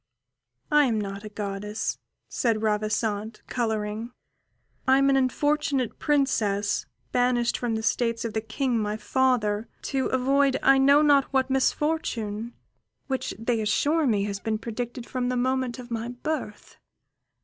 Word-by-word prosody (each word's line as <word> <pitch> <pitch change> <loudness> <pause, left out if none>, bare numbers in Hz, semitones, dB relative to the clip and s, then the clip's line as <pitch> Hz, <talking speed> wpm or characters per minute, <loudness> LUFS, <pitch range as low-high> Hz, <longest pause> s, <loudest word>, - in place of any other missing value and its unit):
"I 295 -1 +6
am 225 -4 +1
not 200 0 -5
a 215 - -7
goddess," 205 0 -4 0.3
said 225 -3 0
Ravissante, 215 0 -1
colouring; 220 -1 -2 0.8
"I 265 +1 +6
am 275 0 +4
an - - +3
unfortunate 270 -1 +1
princess 215 -9 +1 0.2
banished 245 -1 +2
from 235 -2 -1
the 220 - -3
states 230 +1 0
of 225 - -3
the 220 - -1
King, 235 +2 -1
my 210 0 -2
father, 225 -3 +1 0.2
to 270 -2 -1
avoid 270 +1 +2
I 270 0 +6
know 280 +2 +6
not 285 -2 +5
what 265 -1 0
misfortune, 240 -6 -1 0.5
which 265 -1 -3
they 225 +1 0
assure 290 +8 +2
me 205 -4 +2
has 200 -1 -3
been 220 +1 -1
predicted 240 +2 -5
from 250 -1 -2
the 250 - 0
moment 255 0 0
of 245 -1 -10
my 230 0 -2
birth." 245 -2 -5
240 Hz, 145 wpm, -26 LUFS, 215-265 Hz, 0.8 s, I